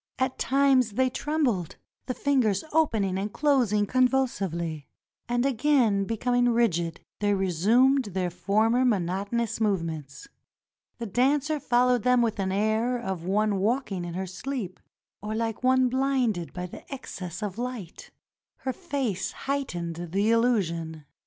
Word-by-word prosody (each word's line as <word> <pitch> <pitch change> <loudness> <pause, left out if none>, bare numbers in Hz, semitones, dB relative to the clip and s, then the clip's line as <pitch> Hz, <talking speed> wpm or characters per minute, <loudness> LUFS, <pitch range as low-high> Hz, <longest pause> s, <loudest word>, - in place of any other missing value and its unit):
At 260 0 -1
times 265 -4 +3
they 255 +3 +1
trembled 255 - -1
— - - -56
the 255 - -2
fingers 250 -9 +1
opening 220 -12 +1
and 205 +2 -3
closing 245 -9 +2
convulsively; 195 - 0 0.4
and 245 +1 +1
again 250 -6 +2
becoming 245 +3 +1
rigid 175 -8 +1 0.2
they 205 -1 +2
resumed 220 - +3
their 185 -3 -2
former 220 +7 +2
monotonous 205 +1 -1
movements. 165 -9 -2 0.7
The 235 - -5
dancer 280 +7 +1
followed 250 -2 +2
them 250 0 +3
with 225 -2 -1
the 190 -1 -1
air 220 +5 +1
of 190 -8 -4
one 205 +2 +1
walking 215 -3 -1
in 175 -1 -6
her 190 +1 -2
sleep, 190 0 -5 0.4
or 210 +1 -4
like 225 +1 -2
one 260 0 +4
blinded 250 -8 0
by 180 0 -7
excess 190 - -7
of 205 +1 -4
light. 240 -8 -6 0.5
Her 260 - -2
face 270 - -3
heightened 175 -13 -3
the 175 0 -5 0.2
illu 230 -2 +3
sion. 160 -2 -6
225 Hz, 135 wpm, -27 LUFS, 190-255 Hz, 0.7 s, one